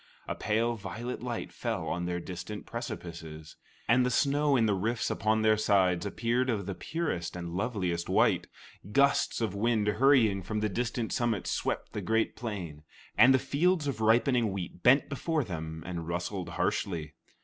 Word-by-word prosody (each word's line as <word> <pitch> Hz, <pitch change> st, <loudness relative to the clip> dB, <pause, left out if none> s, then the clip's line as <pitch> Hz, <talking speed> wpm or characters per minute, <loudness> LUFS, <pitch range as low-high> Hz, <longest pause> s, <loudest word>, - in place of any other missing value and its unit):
A -, -, -1 dB
pale 115 Hz, +3 st, 0 dB
violet 110 Hz, +5 st, -5 dB
light 120 Hz, -1 st, -4 dB
fell 110 Hz, -9 st, -3 dB
on 90 Hz, 0 st, -2 dB
their 90 Hz, 0 st, -2 dB
distant 90 Hz, +4 st, -7 dB
precipices, 85 Hz, -, -7 dB, 0.3 s
and 125 Hz, +3 st, +4 dB
the 125 Hz, -, +1 dB
snow 145 Hz, +2 st, +2 dB
in 115 Hz, -3 st, +3 dB
the 105 Hz, -, +2 dB
rifts 110 Hz, +4 st, -1 dB
upon 110 Hz, +1 st, +1 dB
their 110 Hz, 0 st, +4 dB
sides 95 Hz, -3 st, +2 dB
appeared 120 Hz, +5 st, 0 dB
of 105 Hz, -5 st, -1 dB
the 100 Hz, -, -3 dB
purest 120 Hz, -, -3 dB
and 85 Hz, -1 st, -5 dB
loveliest 90 Hz, -3 st, -2 dB
white. -, -, +3 dB, 0.4 s
Gusts 140 Hz, 0 st, +3 dB
of 110 Hz, -4 st, 0 dB
wind 110 Hz, +1 st, +1 dB
hurrying 110 Hz, -2 st, +4 dB
from 105 Hz, +4 st, -3 dB
the 105 Hz, 0 st, 0 dB
distant 115 Hz, +2 st, -2 dB
summits 115 Hz, -5 st, 0 dB
swept -, -, -2 dB
the -, -, -3 dB
great 110 Hz, 0 st, 0 dB
plain, 95 Hz, -10 st, -5 dB, 0.3 s
and 125 Hz, -, +7 dB
the 130 Hz, -, +6 dB
fields 150 Hz, +6 st, +1 dB
of 135 Hz, -6 st, -3 dB
ripening 115 Hz, 0 st, +3 dB
wheat 90 Hz, -2 st, -6 dB
bent 130 Hz, +4 st, +5 dB
before 155 Hz, +2 st, -1 dB
them 80 Hz, -5 st, -6 dB
and 85 Hz, -2 st, -5 dB
rustled 90 Hz, +1 st, -3 dB
harshly. 80 Hz, -2 st, -2 dB
110 Hz, 170 wpm, -30 LUFS, 90-120 Hz, 0.4 s, and